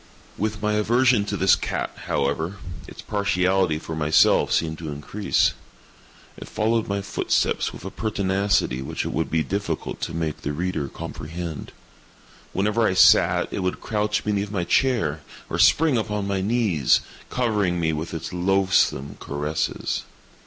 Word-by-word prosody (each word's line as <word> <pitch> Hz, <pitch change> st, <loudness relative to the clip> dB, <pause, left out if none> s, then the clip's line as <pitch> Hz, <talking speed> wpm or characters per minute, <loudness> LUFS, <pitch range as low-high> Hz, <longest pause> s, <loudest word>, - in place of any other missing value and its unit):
With 110 Hz, 0 st, -3 dB
my 105 Hz, 0 st, +1 dB
aversion 120 Hz, +1 st, +3 dB
to -, -, -3 dB
this -, -, +5 dB
cat, -, -, -3 dB, 0.2 s
however, 80 Hz, +7 st, -1 dB, 0.3 s
its -, -, -11 dB
partiality 95 Hz, -4 st, +1 dB
for 80 Hz, 0 st, -6 dB
myself 75 Hz, 0 st, +4 dB
seemed 80 Hz, -1 st, 0 dB
to 80 Hz, -2 st, -5 dB
increase. 75 Hz, +8 st, 0 dB, 0.8 s
It -, -, -9 dB
followed 110 Hz, +1 st, 0 dB
my 100 Hz, 0 st, -2 dB
footsteps 100 Hz, -, 0 dB
with -, -, -11 dB
a 95 Hz, -, -5 dB
pertinacity 100 Hz, -, 0 dB
which 65 Hz, -, -4 dB
it -, -, -3 dB
would -, -, -1 dB
be 80 Hz, 0 st, +1 dB
difficult 90 Hz, 0 st, -3 dB
to 80 Hz, -, -3 dB
make 80 Hz, -2 st, -3 dB
the 75 Hz, -, -3 dB
reader 85 Hz, -2 st, -2 dB
comprehend. 80 Hz, +3 st, -7 dB, 0.8 s
Whenever 105 Hz, +4 st, +1 dB
I 95 Hz, -, 0 dB
sat, -, -, +5 dB
it -, -, -2 dB
would 90 Hz, -1 st, -2 dB
crouch 105 Hz, -1 st, -1 dB
beneath 105 Hz, -1 st, -1 dB
my 100 Hz, -4 st, -2 dB
chair, 85 Hz, -, +1 dB, 0.3 s
or -, -, -2 dB
spring 155 Hz, -6 st, +4 dB
upon 105 Hz, -2 st, -2 dB
my 100 Hz, -1 st, -1 dB
knees, 100 Hz, -, +2 dB, 0.3 s
covering 105 Hz, -8 st, 0 dB
me 80 Hz, -1 st, +1 dB
with 80 Hz, +2 st, -4 dB
its 80 Hz, +2 st, -6 dB
loathsome 95 Hz, -6 st, +1 dB
caresses. 75 Hz, +2 st, -2 dB
95 Hz, 150 wpm, -24 LUFS, 80-105 Hz, 0.8 s, this